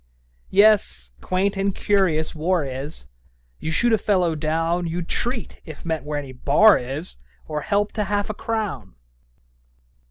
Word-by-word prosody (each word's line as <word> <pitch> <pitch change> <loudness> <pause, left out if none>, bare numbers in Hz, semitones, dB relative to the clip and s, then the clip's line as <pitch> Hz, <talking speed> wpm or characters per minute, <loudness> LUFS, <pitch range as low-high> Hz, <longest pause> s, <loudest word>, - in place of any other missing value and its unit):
'Yes; 200 - +3
quaint 190 +2 0
and 195 0 0
curious 180 -6 +1
war 165 0 0
is! 135 - -7 0.5
You 160 - -4
shoot 235 +9 +2
a 220 - +3
fellow 185 -5 +2
down 165 +3 -1
You'd 170 +1 -3
treat, 240 -2 -3
if 155 -1 -11
met 160 -3 -2
where 150 0 -3
any 140 -2 -5
bar 150 +11 +5
is, 135 +8 -6 0.3
Or 150 -1 -3
help 205 +3 0
to 210 -2 -2
half 205 +1 -1
a 215 - -3
crown.' 200 - -4
175 Hz, 150 wpm, -23 LUFS, 150-205 Hz, 0.5 s, bar